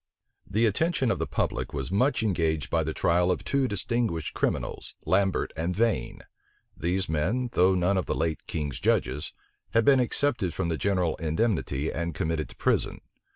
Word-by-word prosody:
The 110 Hz, +2 st, +2 dB
attention 130 Hz, -, +1 dB
of -, -, -1 dB
the -, -, -1 dB
public -, -, -2 dB
was 70 Hz, +3 st, -3 dB
much 125 Hz, +5 st, +2 dB
engaged 80 Hz, -7 st, 0 dB
by 80 Hz, -1 st, +2 dB
the 80 Hz, -, -2 dB
trial 90 Hz, +3 st, +2 dB
of 90 Hz, -, 0 dB
two 140 Hz, -1 st, +1 dB
distinguished 105 Hz, -5 st, -1 dB
criminals, -, -, -2 dB
Lambert 95 Hz, 0 st, +1 dB
and 85 Hz, +3 st, -2 dB
Vane. 115 Hz, 0 st, 0 dB, 0.5 s
These 90 Hz, +2 st, -1 dB
men, 105 Hz, +12 st, 0 dB
though 95 Hz, +1 st, +4 dB
none 90 Hz, +2 st, +2 dB
of -, -, -4 dB
the -, -, 0 dB
late 80 Hz, -1 st, -2 dB
king's 75 Hz, -4 st, -3 dB
judges, 70 Hz, +5 st, 0 dB, 0.4 s
had 115 Hz, -1 st, +4 dB
been 135 Hz, -2 st, +6 dB
excepted 120 Hz, -6 st, +1 dB
from 85 Hz, -, -1 dB
the 80 Hz, -, -1 dB
general 90 Hz, -5 st, +1 dB
indemnity, 80 Hz, -, 0 dB
and 85 Hz, -1 st, -3 dB
committed 80 Hz, -1 st, -1 dB
to -, -, -13 dB
prison. -, -, 0 dB
90 Hz, 170 wpm, -27 LUFS, 80-115 Hz, 0.5 s, been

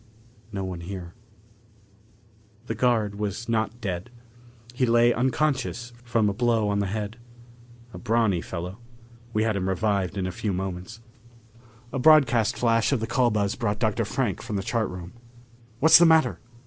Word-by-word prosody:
No 100 Hz, -2 st, -4 dB
one 90 Hz, -2 st, -5 dB
here. 90 Hz, -1 st, -7 dB, 1.5 s
The -, -, -3 dB
guard 110 Hz, -5 st, 0 dB
was 105 Hz, +2 st, -3 dB
not 110 Hz, 0 st, -1 dB
dead. 95 Hz, 0 st, -4 dB, 0.6 s
He 125 Hz, 0 st, +1 dB
lay 120 Hz, +1 st, +4 dB
unconscious 130 Hz, -2 st, -1 dB
from 115 Hz, -3 st, +1 dB
a 100 Hz, -, 0 dB
blow 115 Hz, -2 st, +1 dB
on 100 Hz, 0 st, 0 dB
the 100 Hz, -, 0 dB
head. 105 Hz, +2 st, -4 dB, 0.8 s
A -, -, -8 dB
brawny 110 Hz, -6 st, +1 dB
fellow. 90 Hz, +5 st, -6 dB, 0.5 s
We 110 Hz, -1 st, +1 dB
had 110 Hz, -2 st, 0 dB
him 95 Hz, -1 st, -1 dB
revived 100 Hz, -1 st, 0 dB
in 95 Hz, -, -1 dB
a 95 Hz, -, -2 dB
few 100 Hz, +2 st, -3 dB
moments. 95 Hz, +4 st, -5 dB, 0.9 s
A 135 Hz, -, -1 dB
broadcast 135 Hz, -6 st, +4 dB
flash 115 Hz, 0 st, +2 dB
of 135 Hz, -, +1 dB
the 110 Hz, -, -2 dB
call 120 Hz, +1 st, +2 dB
buzz 105 Hz, -2 st, 0 dB
brought 105 Hz, -2 st, -2 dB
Dr. 110 Hz, 0 st, 0 dB
Frank 110 Hz, -2 st, -2 dB
from 105 Hz, -, -5 dB
the 95 Hz, -, -2 dB
chart 110 Hz, 0 st, -1 dB
room. 90 Hz, -1 st, -8 dB, 0.7 s
"What's 160 Hz, +5 st, +8 dB
the 170 Hz, -, +7 dB
matter?" 160 Hz, -6 st, +3 dB
110 Hz, 160 wpm, -25 LUFS, 100-120 Hz, 1.5 s, What's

